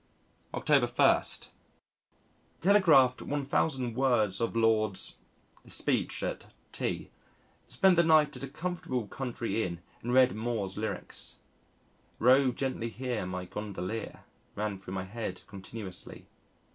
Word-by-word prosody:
October - - +3
1. - - +4 1.4
Telegraphed 160 -10 +5
1,000 135 -3 -1
words 120 -7 +2
of 115 - -1
Lord 110 -3 +2
's - - -2 0.5
speech - - 0
at - - -3 0.2
T. - - -3 0.6
Spent 190 -2 +4
the 170 - +6
night 155 -2 +4
at - - -7
a - - -3
comfortable 140 -5 -3
country 120 -1 -3
inn 85 -2 -4 0.2
and 120 - -3
read 130 0 +5
Moore's 110 -4 -2
lyrics. 110 +1 -3 0.8
"Row 130 +2 +5
gently 125 -2 -2
here, 120 -4 -3
my 90 0 -4
Gondolier," 105 +2 -5 0.3
ran 105 -2 -2
through 95 0 -7
my 95 - -2
head 110 +3 -5
continuously. 100 -1 -7
115 Hz, 120 wpm, -30 LUFS, 105-135 Hz, 1.4 s, the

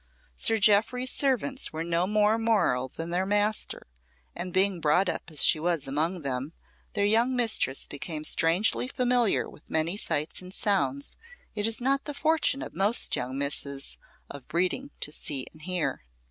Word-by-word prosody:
Sir 225 - +2
Jeoffry's 220 +5 +3
servants 270 0 0
were 160 +1 -4
no 170 +2 0
more 210 +2 +2
moral 205 - +1
than 165 +6 -6
their 180 +2 +1
master, 205 +1 0 0.5
and 180 - -5
being 190 -1 +1
brought 160 +6 +3
up - - -3
as 155 -2 +5
she 155 - +5
was 170 -2 -1
among 160 +6 -1
them, 135 +2 -4 0.4
their 200 -1 +1
young 230 +5 +3
mistress 225 - +2
became 150 +2 -5
strangely 175 +10 +2
familiar 245 -4 +1
with - - -16
many 160 +3 0
sights 155 -5 -2
and 185 +1 -7
sounds 140 - 0 0.4
it 210 0 0
is 225 - -2
not 275 +2 0
the 295 - -5
fortune 310 -2 +2
of - - -8
most 205 +5 0
young 130 +2 -4
misses 140 -1 -2 0.3
of 140 -2 -10
breeding 185 - -1
to 150 - -1
see 140 -3 -1
and 155 - -15
hear. 180 0 -2
185 Hz, 165 wpm, -27 LUFS, 155-225 Hz, 0.5 s, as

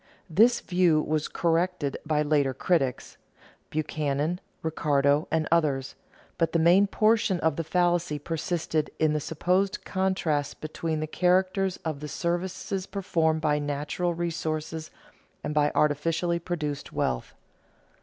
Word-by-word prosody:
This 225 +9 +5
view 175 -3 +3
was 155 0 -1
corrected 170 -3 0
by 150 -1 +2
later 145 -3 +1
critics 140 -9 0 0.5
(Buchanan, 155 +2 -1 0.2
Ricardo, 145 -2 +2
and 160 -1 0
others), 145 -6 +1 0.5
but 165 -1 +1
the - - +4
main 175 +5 +5
portion 215 -3 +2
of 160 -2 +2
the 165 - -2
fallacy 175 -2 +1
persisted 160 0 -2
in 155 -1 +2
the 150 - +1
supposed 180 +6 0
contrast 185 -7 -1
between 155 0 -3
the - - 0
characters 185 +3 +1
of 155 -3 -2
the 150 - -6
services 185 +3 -3
performed 165 -5 0
by 150 -1 +2
natural 145 +4 -2
resources 160 -2 -3 0.5
and 150 - -3
by 150 -1 +3
artificially 165 +3 +1
produced 155 -5 -4
wealth. 60 -2 -2
160 Hz, 125 wpm, -27 LUFS, 150-180 Hz, 0.5 s, This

